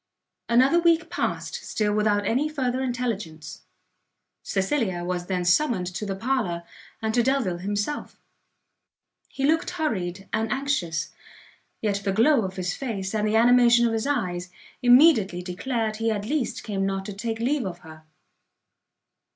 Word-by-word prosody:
Another 260 Hz, +8 st, +5 dB
week 340 Hz, 0 st, +2 dB
past -, -, -3 dB
still 210 Hz, -1 st, -1 dB
without 210 Hz, -1 st, +1 dB
any 265 Hz, +9 st, +1 dB
further 260 Hz, -4 st, -1 dB
intelligence. 220 Hz, -, -4 dB, 0.8 s
Cecilia 195 Hz, -3 st, -1 dB
was 175 Hz, 0 st, -3 dB
then 180 Hz, -2 st, -1 dB
summoned 190 Hz, 0 st, +2 dB
to 210 Hz, +3 st, -4 dB
the 195 Hz, -, -2 dB
parlour, 200 Hz, -7 st, -1 dB, 0.4 s
and 220 Hz, 0 st, 0 dB
to 240 Hz, -, +4 dB
Delvile 235 Hz, -9 st, 0 dB
himself. 205 Hz, +9 st, -3 dB, 1.1 s
He 270 Hz, -, -2 dB
looked 320 Hz, +4 st, +2 dB
hurried 200 Hz, -, -3 dB
and 220 Hz, +1 st, 0 dB
anxious; 260 Hz, -, -1 dB, 0.7 s
yet 205 Hz, -2 st, +1 dB
the 195 Hz, -, 0 dB
glow 240 Hz, +6 st, +4 dB
of 190 Hz, 0 st, -5 dB
his 180 Hz, -1 st, -2 dB
face, 205 Hz, -7 st, -4 dB
and 215 Hz, -1 st, 0 dB
the 215 Hz, -, +1 dB
animation 240 Hz, 0 st, +5 dB
of 230 Hz, -, +1 dB
his 225 Hz, +3 st, -1 dB
eyes, 180 Hz, -10 st, -2 dB, 0.3 s
immediately 245 Hz, -, +5 dB
declared 215 Hz, +4 st, -2 dB
he 225 Hz, 0 st, 0 dB
at 205 Hz, -2 st, -2 dB
least 275 Hz, 0 st, -2 dB
came 195 Hz, -3 st, -2 dB
not 195 Hz, 0 st, -2 dB
to 205 Hz, -, -6 dB
take 225 Hz, +3 st, -3 dB
leave 250 Hz, +1 st, 0 dB
of 175 Hz, -1 st, -7 dB
her. 155 Hz, 0 st, -13 dB
220 Hz, 150 wpm, -25 LUFS, 190-255 Hz, 1.1 s, Another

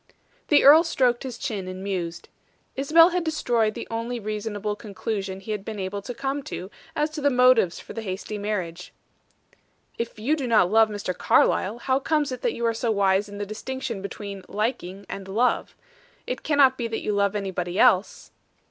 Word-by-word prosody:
The 295 Hz, -, +5 dB
earl 300 Hz, +4 st, +9 dB
stroked 250 Hz, -7 st, +1 dB
his 255 Hz, -3 st, -6 dB
chin 200 Hz, -6 st, -4 dB
and 185 Hz, +1 st, -6 dB
mused. 180 Hz, -4 st, -4 dB, 0.5 s
Isabel 325 Hz, +5 st, +6 dB
had 360 Hz, -1 st, -1 dB
destroyed 240 Hz, -9 st, 0 dB
the -, -, -6 dB
only 230 Hz, +2 st, -3 dB
reasonable 210 Hz, -1 st, -3 dB
conclusion 200 Hz, -2 st, -4 dB
he 215 Hz, -, -6 dB
had 210 Hz, -2 st, -3 dB
been 215 Hz, 0 st, -6 dB
able 195 Hz, +1 st, -4 dB
to 245 Hz, +4 st, -7 dB
come 275 Hz, +3 st, -2 dB
to 190 Hz, -4 st, -6 dB, 0.2 s
as 300 Hz, +1 st, 0 dB
to 305 Hz, -1 st, -6 dB
the 285 Hz, -, +4 dB
motives 250 Hz, -8 st, +4 dB
for -, -, -10 dB
the 225 Hz, -, -5 dB
hasty 205 Hz, +1 st, -5 dB
marriage. 180 Hz, -5 st, -4 dB, 1.1 s
"If 235 Hz, -1 st, -4 dB
you 250 Hz, +9 st, +1 dB
do 275 Hz, -5 st, -3 dB
not 215 Hz, -6 st, +4 dB
love 220 Hz, 0 st, +5 dB
Mr. 205 Hz, -3 st, -4 dB
Carlyle, 205 Hz, +5 st, +2 dB
how 260 Hz, +2 st, 0 dB
comes 295 Hz, -1 st, 0 dB
it 255 Hz, -, -5 dB
that 480 Hz, -, 0 dB
you 235 Hz, -, -2 dB
are 230 Hz, -, +2 dB
so 230 Hz, +1 st, -2 dB
wise 200 Hz, -1 st, +2 dB
in 205 Hz, -, -8 dB
the 205 Hz, -, -3 dB
distinction 235 Hz, +1 st, -5 dB
between 200 Hz, 0 st, -7 dB
'liking' 200 Hz, -3 st, -3 dB
and 195 Hz, -1 st, -7 dB
'love?' 225 Hz, +6 st, 0 dB, 0.5 s
It -, -, -4 dB
cannot 275 Hz, -4 st, +4 dB
be 235 Hz, -, -1 dB
that 225 Hz, -1 st, -4 dB
you 210 Hz, -, -1 dB
love 200 Hz, 0 st, +1 dB
anybody 185 Hz, -3 st, -3 dB
else?" 215 Hz, -5 st, +3 dB
215 Hz, 190 wpm, -25 LUFS, 200-255 Hz, 1.1 s, earl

